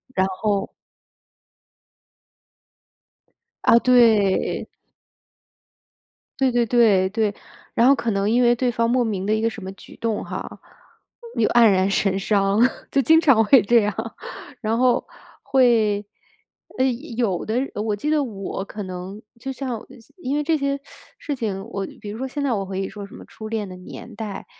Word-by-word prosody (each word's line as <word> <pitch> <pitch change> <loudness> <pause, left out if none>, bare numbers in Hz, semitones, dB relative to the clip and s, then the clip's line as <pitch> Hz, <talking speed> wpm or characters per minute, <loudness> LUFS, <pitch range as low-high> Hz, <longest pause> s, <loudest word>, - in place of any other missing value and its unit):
然 190 - +3
后 195 +1 -1 2.9
啊， - - +6
对。 225 -6 +3 1.7
对 265 -2 +3
对 240 -1 +2
对， 210 -6 +4
对。 215 0 0 0.4
然 235 - +4
后 275 - +6
可 235 -4 -2
能 200 0 0
因 245 +3 +3
为 240 0 +4
对 245 0 0
方 230 0 0
莫 250 +1 +2
名 200 -5 -2
的 210 - +1
一 220 - 0
个 230 - +2
什 220 - -9
么 190 - -6
举 - - -15
动 225 -2 -2
哈， - - -7 0.8
又 220 - +2
黯 240 - +5
然 190 0 +2
神 195 -1 +1
伤， 200 0 +1 0.3
就 275 - +3
经 320 +6 +5
常 270 -9 +5
会 250 +3 +6
这 230 +4 +4
样。 210 0 -1 0.7
然 225 0 0
后 250 0 +2 0.4
会 225 -6 +3 0.7
呃， 260 - +3 0.3
有 215 -7 0
的 220 - -2 0.2
我 210 0 -1
记 250 +9 -3
得 305 -2 +2
我 195 -5 -5
可 210 0 -7
能 185 +2 -7 0.2
就 270 +3 -5
像 255 -4 -5 0.3
因 280 -5 -3
为 295 - 0
这 320 +2 +1
些 280 -1 -1 0.4
事 290 - -4
情 205 -6 -3
我 195 -3 -3 0.2
比 205 - -7
如 210 - -6
说 265 - -3
现 285 +2 -4
在 270 -3 +1
我 200 -3 -1
可 190 0 -6
以 195 0 -2
说 205 -1 -8
什 - - -14
么 - - -12
初 220 - -10
恋 215 -2 -3
的 185 - -9
年 180 - -11
代， 215 -3 -6
220 Hz, 180 characters per minute, -22 LUFS, 200-245 Hz, 2.9 s, 啊